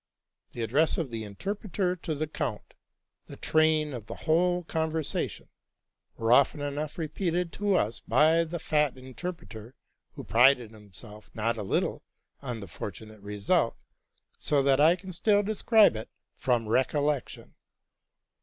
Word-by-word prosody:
The 120 - -4
address 140 +9 +2
of 155 -7 -3
the 115 -1 -4
interpreter 185 - -3
to 165 -3 -4
the 155 +2 -2
count, 125 -7 -5 0.5
the - - -10
train 155 -2 +2
of 115 -4 -7
the - - -6
whole 175 +2 +2
conversation, 160 -2 -2 0.7
were 115 +1 +2
often 140 +3 +4
enough 145 +1 -4
repeated 170 +1 -2
to 205 -2 +1
us 115 - 0
by 160 +2 +3
the 165 +1 -5
fat 150 -4 0
interpreter, 130 -4 -8 0.4
who - - -8
prided 120 +3 +4
himself 105 0 -12
not 115 +2 0
a 110 - -5
little 95 - -1 0.4
on 120 -5 -5
the 100 - -8
fortunate 105 +4 -8
result, 100 0 0 0.6
so 145 -2 +2
that 135 0 +3
I 160 +4 +6
can 185 0 -10
still 205 +4 +2
describe 215 - +4
it 110 - -6 0.3
from 120 -3 0
recollec 140 +4 +1
tion. - - -12
145 Hz, 145 wpm, -28 LUFS, 115-165 Hz, 0.7 s, I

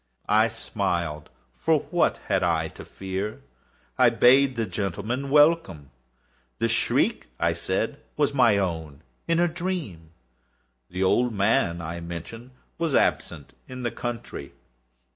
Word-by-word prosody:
I 110 +2 +5
smiled,—for 75 - -2
what - - +2
had - - +1
I 80 -2 +1
to - - -11
fear? 95 +2 -5 0.6
I - - +7
bade 130 +1 +5
the 115 - -1
gentlemen 105 +8 -3
welcome. 145 - +3 0.7
The - - +1
shriek, - - +1
I - - +2
said, - - -2 0.2
was 145 -2 +2
my 120 -6 +4
own 80 -6 -3 0.2
in 165 0 +2
a 175 - +4
dream. 165 - -4 0.8
The 90 +2 -2
old 120 +4 +2
man, 95 -4 +1
I 85 +2 -5
mentioned, 85 +8 -8 0.3
was 165 -4 0
absent 70 -5 0
in 125 0 -7
the 120 - -1
country. 120 -2 -6
100 Hz, 125 wpm, -25 LUFS, 85-125 Hz, 0.8 s, I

